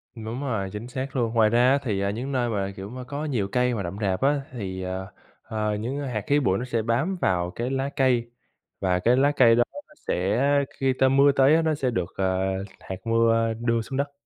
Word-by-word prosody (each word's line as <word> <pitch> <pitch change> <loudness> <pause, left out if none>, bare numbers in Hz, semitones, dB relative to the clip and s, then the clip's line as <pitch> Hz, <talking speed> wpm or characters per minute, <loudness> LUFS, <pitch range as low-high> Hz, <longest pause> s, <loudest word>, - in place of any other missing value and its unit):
Đúng 115 +3 -5
rồi, 110 -9 -2
chính 105 +4 -6
xác 130 +2 -5
luôn. 115 -3 0
Ngoài 110 -2 +4
ra 120 +3 +4
á 140 - +4
thì, 105 -7 -1
à, 100 - 0
những 120 +7 -4
nơi 125 -3 0
mà, 100 -2 -2
kiểu, 95 +1 -7
mà 125 +2 -7
có 145 +4 -5
nhiều 120 -10 -1
cây 125 0 +2
mà 100 - -3
rậm 90 +2 -5
rạp 95 -3 0
á, 140 +1 +2
thì, 95 -6 -5
ờ, 95 +1 -4 0.4
ờ, 105 -2 -2
những 120 +7 -3
hạt 125 -7 -3
khí 145 +1 +3
bụi 95 -9 +1
nó 125 - -3
sẽ 115 -3 -1
bám 120 - 0
vào 90 -1 +1
cái 120 +5 -3
lá 135 +1 -1
cây 125 -4 +2 0.5
và 90 -2 +1
cái 120 +6 +3
lá 140 +2 +4
cây 115 -4 +6
đó 120 - +4 0.2
nó 300 - -20
sẽ 95 +6 0 0.4
khi 135 -1 +2
ta 130 +1 +3
mưa 140 +2 +5
tới 135 +2 +5
á 165 - +3
nó 160 -1 +1
sẽ 135 -3 -1
được, 90 -4 -3
ờ, 95 -1 +1 0.4
hạt 95 - -6
mưa 115 0 +2
đưa 115 -1 +1
xuống 130 +4 -5
đất. 140 +1 -1
120 Hz, 240 wpm, -25 LUFS, 105-135 Hz, 0.5 s, cây